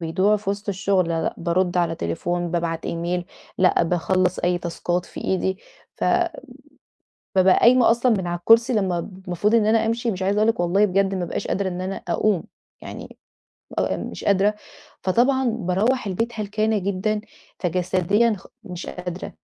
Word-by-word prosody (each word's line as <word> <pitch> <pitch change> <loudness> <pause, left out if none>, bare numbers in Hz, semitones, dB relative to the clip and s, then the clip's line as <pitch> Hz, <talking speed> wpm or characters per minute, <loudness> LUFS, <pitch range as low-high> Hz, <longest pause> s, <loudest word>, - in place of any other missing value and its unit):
بيضيعوا 185 +6 +2
في 200 -1 -3
وِسط 200 +1 -5
الشُغل 190 -2 +1
لا، 165 -1 -1
لأ - - -2
بارُد 175 +1 0
على 170 -2 +1
تليفون، 175 - -2
بابعت 165 -1 -2
إيميل، 175 +1 -2 0.3
لأ 185 -1 +4
باخلّص 180 +2 +1
أي 175 0 +1
تاسكات 175 +1 -2
في - - -9
إيدي، 190 0 0 0.4
ف - - -3 1.3
بابقى 185 0 +5
قايمة 245 0 +6
أصلًا 235 +1 +3
من 185 - -3
على 175 0 -2
الكرسي 225 +7 +5
لمّا 190 -6 +1
ب 185 +2 -10
المفروض 195 +5 +1
إن 215 -2 +4
أنا 220 0 +3
أمشي 230 +1 0
مش 190 -2 -4
عايزة 200 +2 +1
أقول 215 +1 +3
لِك 225 - -3
والله 180 +4 +3
بجد 195 0 +1
ما 185 -2 -2
بقاش - - -4
قادرة 195 -1 -1
إن 180 0 -5
أنا 190 +1 -3
أقوم، 185 +1 +1 0.4
يعني - - -9 0.6
أبقى - - 0
مش - - -7
قادرة، 200 +1 +3 0.5
فطبعًا 255 +7 +2
باروّح 225 +2 0
البيت 225 +5 -2
هلكانة 215 +1 0
جدًا، 200 +2 -1 0.4
فجسديًا 185 +5 +1
خ - - -15 0.2
مش 180 -3 -7
قادرة. 180 0 -6
190 Hz, 170 wpm, -23 LUFS, 175-215 Hz, 1.3 s, قايمة